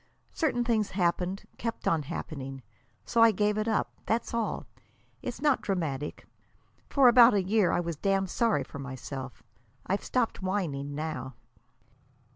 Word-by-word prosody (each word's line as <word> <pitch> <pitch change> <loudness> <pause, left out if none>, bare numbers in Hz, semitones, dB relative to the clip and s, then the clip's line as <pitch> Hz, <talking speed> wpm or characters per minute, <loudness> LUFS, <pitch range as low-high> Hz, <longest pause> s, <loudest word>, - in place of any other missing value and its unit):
Certain 265 -7 +1
things 225 -3 +1
happened; 180 +1 0 0.2
kept 230 0 -3
on 165 -2 +3
happening. 135 -2 -6 0.4
So 230 - +2
I 230 - +9
gave 210 0 +1
it 215 - -1
up. 220 - 0
That's 230 +2 0
all. 230 -2 -1 0.6
It's 250 +2 -5
not 290 -4 +3
dramatic. 150 -7 -3 0.6
For 275 -3 +5
about 240 -1 +8
a 195 - +2
year 195 -2 +3
I - - +1
was 170 -3 -4
damned 195 +1 0
sorry 230 -3 +2
for 140 - -10
myself. 135 -3 -7 0.4
I've 195 +2 -1
stopped 240 -5 0
whining 155 -8 -2
now." 145 -5 -4
195 Hz, 145 wpm, -29 LUFS, 150-230 Hz, 0.6 s, I